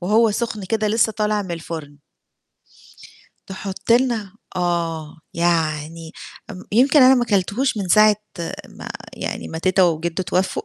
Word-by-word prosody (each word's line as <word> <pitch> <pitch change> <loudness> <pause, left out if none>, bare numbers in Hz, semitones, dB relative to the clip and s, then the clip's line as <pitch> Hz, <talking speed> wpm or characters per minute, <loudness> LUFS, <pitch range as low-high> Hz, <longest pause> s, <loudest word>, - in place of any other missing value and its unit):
وهو 215 +5 +3
سخن 215 -1 -3
كده 215 +2 -1
لسّه 220 +1 +2
طالع 210 -1 0
من 190 - -9
الفرن. 160 -3 -6 1.5
تحط 195 +3 -4
لنا 235 -5 +2 0.2
آه 170 -4 -2 0.2
يعني 165 -1 -1 0.4
امم 185 -1 -9
يمكن 265 +6 +5
أنا 260 +1 +8
ما 245 -1 +1
كلتهوش 215 +5 0
من 195 -3 -3
ساعة 215 +3 +6 0.5
ما - - -10 0.2
يعني - - -5
ما 160 - -6
تيتة 185 +2 +3
وجدّوا 170 +2 -1
اتوفوا، 185 +2 -1
190 Hz, 135 wpm, -21 LUFS, 170-215 Hz, 1.5 s, أنا